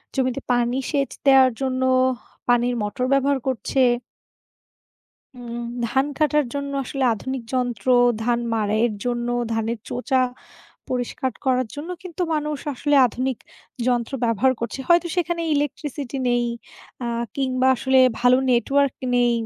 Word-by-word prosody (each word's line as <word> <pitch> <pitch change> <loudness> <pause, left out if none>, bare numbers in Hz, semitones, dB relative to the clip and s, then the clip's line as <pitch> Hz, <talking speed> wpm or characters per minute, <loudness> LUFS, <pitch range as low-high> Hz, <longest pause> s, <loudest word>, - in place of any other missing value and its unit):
জমিতে 260 0 0
পানি 245 +1 +1
সেচ 280 -3 0 0.2
দেওয়ার 265 -1 +7
জন্য 260 -1 -1 0.7
পানির 245 0 +3
মোটর 210 +5 -2
ব্যবহার 275 0 +2
করছে। 260 +1 0 1.6
উম 240 -1 -6 0.2
ধান 265 +4 +1
কাটার 300 -1 +3
জন্য 280 0 -3
আসলে 270 +1 -2
আধুনিক 260 +4 -5
যন্ত্র, 245 -3 -2 0.4
ধান 240 +1 +1
মাড়াইয়ের 215 +1 +1
জন্য, 240 -1 -1 0.2
ধানের 225 +1 -1
চোচা 260 +1 0 0.7
পরিষ্কার 255 +1 -2
করার 255 -1 +2
জন্য 300 +5 -6
কিন্তু 365 -1 -5
মানুষ 300 -1 -2 0.2
আসলে 290 +3 0
আধুনিক 255 +2 -3 0.5
যন্ত্র 240 -1 0
ব্যবহার 235 +3 +2
করছে, 235 +3 -4
হয়তো 345 0 +5
সেখানে 345 -1 0
ইলেকট্রিসিটি 285 -2 -3
নেই 240 0 +2 0.6
আ - - -2 0.3
কিংবা 260 -1 +1
আসলে 265 +2 +2 0.2
ভালো 250 +1 +5
নেটওয়ার্ক 275 +3 +2 0.2
নেই, 245 -1 +3
255 Hz, 125 wpm, -22 LUFS, 240-275 Hz, 1.6 s, দেওয়ার